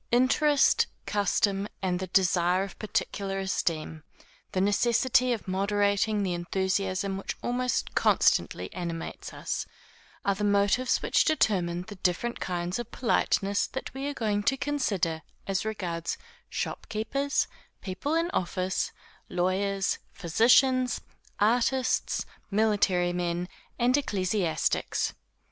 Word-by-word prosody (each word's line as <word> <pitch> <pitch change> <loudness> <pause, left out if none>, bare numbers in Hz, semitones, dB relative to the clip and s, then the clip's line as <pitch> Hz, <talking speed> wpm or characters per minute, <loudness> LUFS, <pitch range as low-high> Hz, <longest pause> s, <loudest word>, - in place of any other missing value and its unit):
Interest, 270 +4 +4 0.2
custom, 200 0 +1 0.2
and 180 -1 0
the 190 - -4
desire 180 0 +3
of 195 - -8
particular 200 -2 -2
esteem, 165 -5 -2 0.5
the 185 - -1
necessity 240 +5 +3
of 230 -5 -3
moderating 205 +2 +1
the 185 -2 0
enthusiasm 190 +2 -1
which - - -5
almost 250 +1 -1
constantly - - +2
animates 170 -2 -5
us, - - -4 0.6
are 200 - +3
the 200 +2 -4
motives 205 +5 +2
which - - +3
determine 180 - +1
the 205 +1 -10
different 185 +7 -1
kinds 180 +2 -2
of 240 -1 -5
politeness 200 -4 +1
that 265 - -6
we 270 +1 -4
are 290 - -3
going 210 -4 0
to 270 +6 +1
consider 200 - -1 0.2
as 195 +1 -1
regards 175 -6 -3 0.3
shopkeepers, 275 +7 -1 0.4
people 205 +11 -2
in 335 +2 +1
office, 185 +1 -1 0.4
lawyers, 190 +2 0
physicians, 250 +7 +3 0.4
artists, 245 +4 +2 0.2
military 200 -4 +2
men, 175 0 -1 0.3
and 245 +1 +3
ecclesiastics. 195 - 0
200 Hz, 115 wpm, -28 LUFS, 185-240 Hz, 0.6 s, Interest